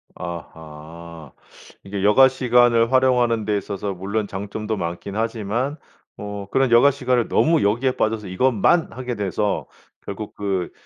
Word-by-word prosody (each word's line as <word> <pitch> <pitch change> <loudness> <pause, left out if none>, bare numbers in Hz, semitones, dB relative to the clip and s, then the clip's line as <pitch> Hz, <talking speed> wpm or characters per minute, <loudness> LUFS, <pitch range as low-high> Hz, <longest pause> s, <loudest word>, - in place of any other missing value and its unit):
아하. 80 -2 -9 0.5
이게 100 0 -5
여가 105 +6 +6
시간을 120 -2 +3
활용하는 125 -4 +2
데 105 -1 0
있어서 100 0 -4
물론 100 +3 -3
장점도 105 +3 -4
많긴 85 +3 -5
하지만 115 +5 -2 0.4
뭐 100 -1 -7
그런 135 -2 +1
여가 120 +4 +6
시간을 125 -3 0
너무 165 -1 +3
여기에 120 +6 +1
빠져서 110 -4 -2
이것만 125 - +2
하게 125 0 -5
돼서 105 0 -2 0.4
결국 100 +1 -7
그 95 -4 -2
105 Hz, 295 characters per minute, -21 LUFS, 95-125 Hz, 0.5 s, 여가